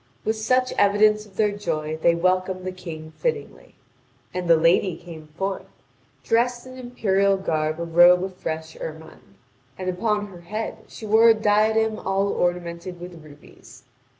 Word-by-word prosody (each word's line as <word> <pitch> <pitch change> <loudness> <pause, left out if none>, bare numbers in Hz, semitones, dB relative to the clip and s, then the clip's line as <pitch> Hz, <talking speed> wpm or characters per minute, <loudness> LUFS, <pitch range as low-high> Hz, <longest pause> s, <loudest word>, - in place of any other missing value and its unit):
With 220 - +1
such 255 +4 +1
evidence 210 +1 +3
of 195 - -22
their 210 -1 +2
joy, 155 -7 -3
they 170 +1 +4
welcome 185 +1 0
the 185 - -3
King 160 -4 -9
fittingly. 465 -2 -4 0.6
And 180 -1 -3
the 165 - +7
Lady 165 +2 +2
came 165 -3 -11
forth, 195 +1 -3 0.6
dressed 240 +2 +1
in 255 0 -11
imperial 200 -6 +1
garb 155 -4 -1
a - - -2
robe 175 +2 +5
of 190 0 -5
fresh 160 -2 -5
ermine 160 -10 -10 0.4
and 185 0 -2
upon 210 +3 -1
her 185 -4 -12
head 215 +6 -5
she 220 - -10
wore 220 +2 +5
a 225 - +6
diadem 215 +1 +2
all 195 +1 0
ornamented 175 0 -2
with 175 -2 -10
rubies. 150 -1 -16
185 Hz, 155 wpm, -23 LUFS, 170-215 Hz, 0.6 s, the